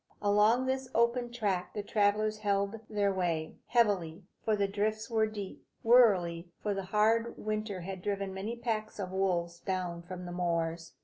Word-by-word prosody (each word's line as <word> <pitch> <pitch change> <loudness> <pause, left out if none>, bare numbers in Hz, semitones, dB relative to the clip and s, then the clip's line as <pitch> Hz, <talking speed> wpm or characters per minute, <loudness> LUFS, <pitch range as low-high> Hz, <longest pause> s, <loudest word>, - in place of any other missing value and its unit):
Along 210 +5 +4
this 260 0 -1
open 235 +1 +2
track 200 -7 -2
the 210 - -2
travellers 215 +1 +1
held 200 +1 0
their 205 -2 +1
way, 170 -4 -1
heavily, 200 -7 +1 0.2
for 220 - +2
the 200 -1 +1
drifts 215 +3 -2
were 220 -1 +3
deep; 205 -3 -7 0.2
warily, 185 -8 +4
for 210 - 0
the 195 -1 -4
hard 220 +4 +2
winter 215 -3 -3
had 190 +1 -6
driven 200 -1 -2
many 200 +5 -4
packs 225 -2 -3
of 190 -3 -4
wolves 175 -3 0
down 180 -2 -3
from 180 +1 -8
the 175 - -6
moors. 170 -2 -1
205 Hz, 165 wpm, -31 LUFS, 180-220 Hz, 0.2 s, Along